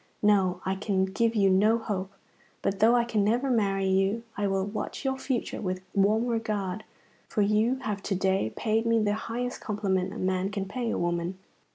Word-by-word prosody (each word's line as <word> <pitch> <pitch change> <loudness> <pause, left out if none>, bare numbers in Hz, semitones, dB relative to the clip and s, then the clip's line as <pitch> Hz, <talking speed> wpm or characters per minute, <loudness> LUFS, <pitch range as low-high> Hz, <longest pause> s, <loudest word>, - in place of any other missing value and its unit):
No, 190 -3 +3
I 190 - +1
can 190 -1 0
give 230 +4 0
you 195 -2 +4
no 210 +4 +4
hope; 200 -4 -3 0.5
but 195 0 -1
though 230 +3 +5
I 240 - +4
can 225 -3 0
never 245 +6 +1
marry 195 -4 +1
you, 195 +4 +1
I 205 0 0
will 195 -1 0
watch 210 +6 -5
your 265 0 +1
future 265 -2 -3
with 185 -2 -2
warm 210 +4 +3
regard, 215 -4 -2 0.4
for 210 - +1
you 215 +5 +2
have 205 -2 -2
to 195 - -2
day 190 - +1
paid 225 +1 0
me 230 0 +3
the 210 -2 +2
highest 240 +3 -4
compliment 195 -4 -1
a 215 - -7
man 185 0 0
can 200 -1 -3
pay 240 +3 -3
a - - -1
woman." 175 +1 -1
205 Hz, 195 wpm, -28 LUFS, 190-225 Hz, 0.5 s, though